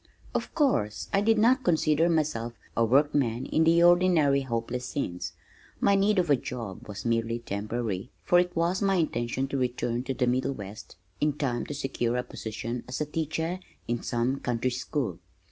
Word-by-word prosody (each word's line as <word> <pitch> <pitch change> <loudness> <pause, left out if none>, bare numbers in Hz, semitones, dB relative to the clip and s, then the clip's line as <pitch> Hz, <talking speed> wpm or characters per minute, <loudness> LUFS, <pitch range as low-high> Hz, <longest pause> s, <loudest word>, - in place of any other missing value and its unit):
Of - - -3
course 110 - +1
I 195 - +4
did 225 +1 +3
not 250 +5 +4
consider 160 -2 +3
myself 145 -8 0 0.2
a 115 - +3
workman 130 -1 +2
in 160 - +2
the 170 +1 +5
ordinary 175 -6 +5
hopeless 120 -1 -3
sense. 90 -9 -3 0.5
My 200 - +4
need 200 +1 +3
of 175 -4 +2
a - - +7
job 115 -7 -6
was 100 0 -7
merely 115 0 +1
temporary, 110 -1 -3
for 175 - +5
it 180 0 0
was 170 +3 +1
my 195 -1 +3
intention 130 -5 0
to 140 - -1
return 120 -1 -1
to 135 - -2
the 125 - +1
Middle 130 +2 +1
West 100 -4 -9 0.2
in 150 0 +2
time 130 -5 -2
to 145 - -5
secure 125 -3 -1
a 125 - 0
position 115 0 -5
as 125 - -4
teacher 160 +3 -2 0.3
in 120 0 -1
some 125 +3 -1
country 125 +1 -1
school. 125 - -3
130 Hz, 175 wpm, -28 LUFS, 115-165 Hz, 0.5 s, a